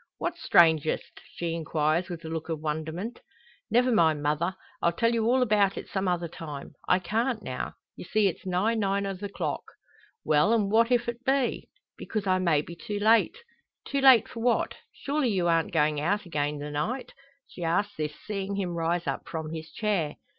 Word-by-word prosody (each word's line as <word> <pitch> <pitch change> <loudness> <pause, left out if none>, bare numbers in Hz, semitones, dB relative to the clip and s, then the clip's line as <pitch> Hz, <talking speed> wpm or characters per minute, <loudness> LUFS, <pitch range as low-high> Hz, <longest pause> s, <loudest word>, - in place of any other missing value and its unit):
"What's 345 0 -3
strangest?" 160 -2 +3
she 170 -1 -2
inquires 160 +1 0
with 170 -2 -7
a - - -4
look 160 0 -4
of 160 -2 -2
wonderment. 160 +8 -4 0.5
"Never 250 +2 +3
mind, 160 -8 +3
mother! 155 +5 0 0.3
I'll 170 - +3
tell 230 +7 +1
you 225 -1 +1
all 255 +2 +4
about 205 -4 +2
it - - -6
some 190 -1 -2
other 175 -1 0
time. 150 -4 -8
I 180 - +5
can't 220 +5 -1
now; 130 -6 -4 0.2
you - - -8
see 215 +3 +2
it's 190 - -1
nigh 190 +5 +1
nine 200 -2 0
o' 195 - -2
the 200 +2 -6
clock." - - -3 0.6
"Well; 155 +10 +4
an' 205 -3 +1
what 230 +2 +4
if't 240 -1 +2 0.2
be?" 270 -1 0 0.3
"Because 215 -2 -3
I 185 -1 +2
may 165 -5 +2
be 170 - -9
too 205 +4 -5
late." 225 - +4 0.5
"Too 280 0 -1
late 265 -4 +7
for 230 - -8
what? 235 +1 +1 0.2
Surely 285 -2 -1
you 185 -5 +1
arn't 165 -1 +2
goin' 150 0 +2
out 205 +7 0
again 150 -3 -1
the 145 +1 -6
night?" 220 - -3 0.3
She 175 - -8
asks 200 +5 +1
this, 150 -1 -3
seeing 200 -1 -3
him 185 -3 -2
rise 170 +1 -1
up - - -3
from 160 -2 -4
his 160 0 -6
chair. 190 -8 -1
185 Hz, 190 wpm, -27 LUFS, 160-220 Hz, 0.6 s, late